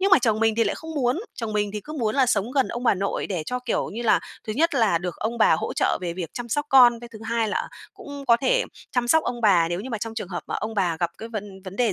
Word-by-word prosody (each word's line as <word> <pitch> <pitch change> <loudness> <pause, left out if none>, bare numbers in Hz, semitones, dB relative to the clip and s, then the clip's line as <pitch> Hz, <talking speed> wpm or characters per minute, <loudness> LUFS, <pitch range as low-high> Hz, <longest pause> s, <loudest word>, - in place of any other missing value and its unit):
Nhưng 390 +1 +2
mà 380 - +8
chồng 225 -3 +1
mình 225 -1 +3
thì 230 - +2
lại - - 0
không 320 0 -8
muốn, 265 +4 +1
chồng 225 -3 -4
mình 205 -1 0
thì 210 - -4
cứ 305 +9 -9
muốn 225 -7 -1
là 265 -2 +4
sống 215 -1 +1
gần 270 -3 +2
ông 240 - -5
bà - - +4
nội 195 +1 -2
để 180 -5 -3
cho, 250 - -2
kiểu 250 -2 -2
như 235 +3 -4
là, 225 - +4 0.3
thứ 215 - -2
nhất 320 +5 +1
là 220 -9 +3
được 180 0 -5
ông 230 +2 -3
bà - - +5
hỗ - - -3
trợ - - +1
về 175 -2 -3
việc 175 -2 -5
chăm 240 -1 -5
sóc 290 +5 -1
con. 245 -4 +6
Cái 240 - -9
thứ 220 - -9
hai 225 -1 0
là - - -2 0.3
cũng 285 -8 -9
có 235 - +6
thể - - +2 0.3
chăm 245 -1 0
sóc 320 +4 +5
ông 240 -1 -3
bà 180 -6 +4
nếu 175 +1 -2
như 255 +5 -7
mà 225 - -2
trong 225 +1 -5
trường 215 -5 -5
hợp 175 -2 -5
mà - - -4
ông 220 +1 -3
bà 180 -5 +1
gặp 170 -1 +1
cái 225 - -7
vấn 205 -4 -7
vấn 190 +1 -8
đề 235 -5 +2
225 Hz, 310 wpm, -24 LUFS, 205-250 Hz, 0.3 s, mà